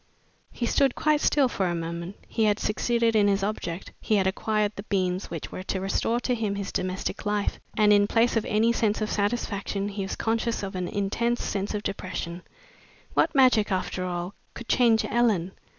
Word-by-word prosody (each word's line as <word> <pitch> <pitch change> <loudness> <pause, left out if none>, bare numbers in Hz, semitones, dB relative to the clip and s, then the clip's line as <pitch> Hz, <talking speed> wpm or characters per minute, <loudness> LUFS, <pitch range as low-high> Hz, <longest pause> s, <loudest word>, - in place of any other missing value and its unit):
He 240 - -3
stood 270 +2 +2
quite 305 -1 +2
still 280 -3 +4
for 195 -6 -1
a 175 - -1
moment. 170 +3 -5
He 220 - +1
had 210 -1 +3
succeeded 230 +1 +1
in 205 -1 +5
his 195 -1 +2
object, 190 -4 -3
he 215 - +1
had 195 -2 +2
acquired 210 +2 0
the - - -5
beans 185 -1 0
which 165 -2 -6
were - - -5
to 190 0 -3
restore 195 +5 0
to 250 - 0
him 215 -4 -1
his 200 -1 -4
domestic 185 +1 -3
life, 205 -1 -1 0.2
and 210 -1 +5
in 205 0 +5
place 230 +3 +2
of 225 - +2
any 225 +3 +2
sense 220 -2 +1
of 215 -1 -2
satisfaction 200 -2 -1
he 200 0 -4
was 195 - -3
conscious 230 0 -1
of 195 - -4
an 180 -1 -2
intense 225 +6 -1
sense 200 +1 -2
of 210 - -3
depression. 185 -3 -4 0.7
What - - +2
magic, 250 -6 +5
after 185 0 -1
all, 180 +1 -3 0.2
could 235 - -8
change 230 -3 +4
Ellen! 215 -7 +1
205 Hz, 195 wpm, -26 LUFS, 190-230 Hz, 0.7 s, in